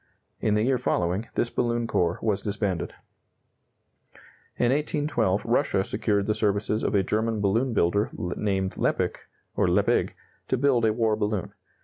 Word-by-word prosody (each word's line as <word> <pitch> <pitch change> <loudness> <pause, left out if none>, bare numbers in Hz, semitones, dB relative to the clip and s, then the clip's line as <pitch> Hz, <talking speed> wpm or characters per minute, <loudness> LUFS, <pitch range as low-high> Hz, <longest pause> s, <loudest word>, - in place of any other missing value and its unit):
In 105 - +1
the 105 - +2
year 130 +1 +2
following, 95 -2 0
this 120 - 0
balloon 120 -1 0
corps 90 -6 0
was 105 -3 0
disbanded. 100 -4 -2 1.6
In 120 0 +2
1812 140 -9 0
Russia 120 -4 +2
secured 100 0 0
the 105 - +1
services 105 +1 0
of - - 0
a 100 - +3
German 110 +2 0
balloon 110 +6 +1
builder 100 +4 +2
named 95 +1 -2
Leppich, - - -1 0.3
or - - +2
Leppig, - - +2 0.3
to 130 - +1
build 125 -3 +3
a 110 - +3
war 110 -1 +1
balloon. 105 -3 -2
105 Hz, 145 wpm, -26 LUFS, 100-120 Hz, 1.6 s, a